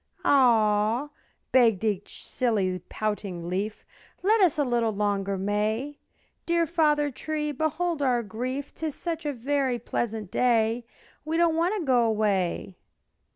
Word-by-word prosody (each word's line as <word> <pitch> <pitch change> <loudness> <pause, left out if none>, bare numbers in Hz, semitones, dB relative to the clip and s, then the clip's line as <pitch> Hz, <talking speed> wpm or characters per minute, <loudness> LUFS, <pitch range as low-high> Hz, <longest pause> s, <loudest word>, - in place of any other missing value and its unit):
"Ah!" 230 0 +3 0.4
begged 230 -6 +4
each 205 -3 -2
silly, 200 -7 0
pouting 200 -5 -3
leaf, 195 +4 -3 0.4
"Let 430 +3 +4
us 350 -6 +4
a 295 - +3
little 240 -3 +1
longer 200 -1 -1
May; 215 +8 -1 0.5
Dear 340 0 +2
Father 300 -3 +2
Tree, 300 +3 -3
behold 315 +3 -1
our 250 -3 +2
grief, 250 +6 -4
'Tis 315 -3 -4
such 330 -3 -4
a - - 0
very 265 0 0
pleasant 220 -3 -3
day 230 -1 +2 0.4
We 315 +2 -3
do - - +3
not 335 -1 +3
want 340 +5 +1
to 375 -6 -3
go 250 -3 +4
away." 200 -5 0
240 Hz, 140 wpm, -26 LUFS, 210-295 Hz, 0.5 s, begged